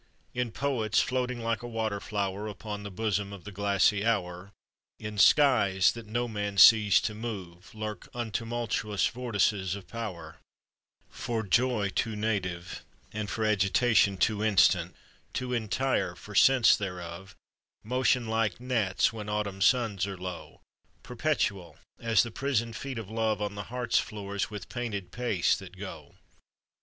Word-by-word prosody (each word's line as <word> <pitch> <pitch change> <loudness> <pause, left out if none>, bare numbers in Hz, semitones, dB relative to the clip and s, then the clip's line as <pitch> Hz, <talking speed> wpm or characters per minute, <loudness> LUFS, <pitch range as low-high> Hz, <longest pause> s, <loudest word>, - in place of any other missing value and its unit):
In 125 -2 -2
poets 115 -6 0
floating 125 -1 -1
like 115 0 -1
a 120 - -6
water 110 -3 -2
flower 100 -1 -3
Upon 105 0 -6
the 100 - -6
bosom 100 0 -2
of 100 -3 -9
the 105 - -8
glassy 100 +1 +2
hour, 95 -4 -1 0.5
In 105 -1 -6
skies 100 -8 +5
that 115 -2 -9
no 120 +3 -1
man 105 -3 -4
sees 105 +1 +8
to 105 - -2
move, 100 -5 -7
Lurk 110 -1 -6
untumultuous 115 -2 -2
vortices 105 -6 0
of 100 - -10
power, 85 -9 -7 0.7
For 115 -2 -3
joy 115 0 +1
too 110 +3 -2
native, 95 -5 -3 0.3
and 105 -1 -3
for 110 0 -1
agitation 100 0 +3
Too 105 +3 +1
instant, 90 -4 +3 0.4
too 125 -1 -3
entire 110 -5 0
for 105 +4 -12
sense 130 +2 +6
thereof, 90 -1 -7 0.5
Motion 125 0 +1
like 110 -1 0
gnats 115 -6 +1
when 105 -2 -6
autumn 105 -2 -2
suns 105 -4 +2
are 100 -1 -6
low, 90 -1 -8 0.4
Perpetual 110 - -2 0.2
as 115 -3 +3
the 120 - -6
prisoned 115 -3 -1
feet 135 -1 -5
of 110 -3 -5
love 110 -2 0
On 105 -1 -2
the 100 0 -6
heart's 125 -1 +1
floors 100 -2 -4
with 105 -5 -7
painèd 100 -7 -4
pace 115 -6 +1
that 95 -1 -11
go. 100 +1 -9
105 Hz, 145 wpm, -29 LUFS, 100-115 Hz, 0.7 s, sees